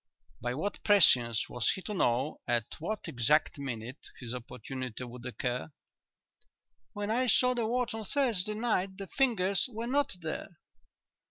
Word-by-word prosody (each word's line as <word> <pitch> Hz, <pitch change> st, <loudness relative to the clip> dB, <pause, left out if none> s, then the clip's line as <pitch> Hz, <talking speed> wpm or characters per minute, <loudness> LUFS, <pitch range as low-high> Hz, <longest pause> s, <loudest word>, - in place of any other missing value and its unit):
By 120 Hz, +2 st, -1 dB
what 200 Hz, +8 st, -3 dB
prescience 125 Hz, -, +5 dB
was 120 Hz, -2 st, -1 dB
he 190 Hz, -, -8 dB
to 210 Hz, -, -4 dB
know 135 Hz, -4 st, +1 dB
at 120 Hz, -2 st, +2 dB
what 210 Hz, +7 st, -3 dB
exact 140 Hz, +5 st, +2 dB
minute 125 Hz, -1 st, -6 dB
his 120 Hz, -2 st, -5 dB
opportunity 125 Hz, 0 st, -6 dB
would 120 Hz, 0 st, -9 dB
occur?" 125 Hz, +3 st, -3 dB, 1.2 s
"When 205 Hz, +1 st, -2 dB
I 250 Hz, +3 st, +2 dB
saw 250 Hz, +3 st, +4 dB
the 235 Hz, -3 st, 0 dB
watch 245 Hz, +1 st, 0 dB
on 220 Hz, -1 st, -4 dB
Thursday 215 Hz, -6 st, +1 dB
night 195 Hz, -4 st, 0 dB
the 195 Hz, -, -5 dB
fingers 200 Hz, -3 st, +1 dB
were 225 Hz, +1 st, -4 dB
not 280 Hz, -1 st, +1 dB
there." 160 Hz, 0 st, -5 dB
180 Hz, 150 wpm, -31 LUFS, -, 1.2 s, prescience